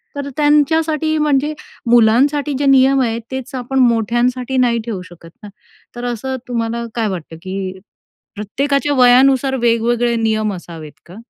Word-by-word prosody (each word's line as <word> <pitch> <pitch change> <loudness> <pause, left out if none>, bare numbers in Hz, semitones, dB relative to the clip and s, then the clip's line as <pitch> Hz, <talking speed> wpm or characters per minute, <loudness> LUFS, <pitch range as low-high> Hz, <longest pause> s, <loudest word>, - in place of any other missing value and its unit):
तर 285 0 -5
त्यांच्यासाठी, 310 +1 +2
म्हणजे 300 0 +1 0.4
मुलांसाठी 270 +6 +3
जे 285 - 0
नियम 270 0 +4
आहेत, 230 -2 -1
तेच 265 -1 -6
आपण 260 +1 -2
मोठ्यांसाठी 245 +2 +1
नाही 240 -2 +2
ठेवू 215 -6 -4
शकत 170 -1 -15
ना. 210 - -9 0.5
तर 240 0 -6
असं 245 +2 -3
तुम्हाला 235 -1 -3
काय 230 -2 0
वाटतं 170 -4 -7
की 190 0 -5 0.6
प्रत्येकाच्या 275 +8 -1
वयानुसार 265 +2 +4
वेगवेगळे 235 0 +1
नियम 215 -2 0
असावेत 165 -4 -10 0.2
का? 175 - -13
245 Hz, 140 wpm, -17 LUFS, 225-275 Hz, 0.6 s, नियम